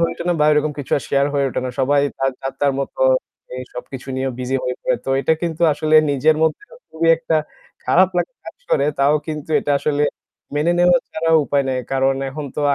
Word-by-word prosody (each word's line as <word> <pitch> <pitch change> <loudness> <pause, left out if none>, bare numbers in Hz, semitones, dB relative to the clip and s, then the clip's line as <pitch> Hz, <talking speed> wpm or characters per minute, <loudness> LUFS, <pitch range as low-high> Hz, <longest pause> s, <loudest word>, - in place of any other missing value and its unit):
হয়ে 170 - +1
ওঠে 170 - -7
না 175 - +2
বা - - +4
ওইরকম 150 0 +1
কিছু 135 -2 -6
আর 140 - -3
share 140 0 +2
হয়ে 140 -1 +2
ওঠে - - -3
না। 130 - -2
সবাই 140 +2 +3 0.2
তার 135 0 +1
যার-তার 135 +1 -1
মতো 140 - -6 0.5
এই 130 - -5
সবকিছু 125 +1 -8
নিয়ে 130 0 -1
busy 130 +1 -1
হয়ে 125 - -2
পড়ে। - - +1
তো - - -3
এইটা 160 - +2
কিন্তু 170 -1 -2
আসলে 155 +1 0 0.2
নিজের 145 +3 +2
মধ্যেও 160 - -1 0.2
খুবই 165 +1 0
একটা 165 -1 0 0.5
খারাপ 185 +1 +4
লাগা - - -1
কাজ - - -10
করে। 140 - +3
তাও 140 +2 +4
কিন্তু 155 -1 -6
এটা - - -3
আসলে 145 0 0 0.5
মেনে 150 +4 +2
নেওয়া 175 0 +5
ছাড়া 165 +1 -1
উপায় 140 0 0
নাই। 130 -1 -1
কারণ 135 0 +2 0.2
এখন 150 +2 -6
তো - - -1
আ - - +3
145 Hz, 215 wpm, -20 LUFS, 135-160 Hz, 0.5 s, নেওয়া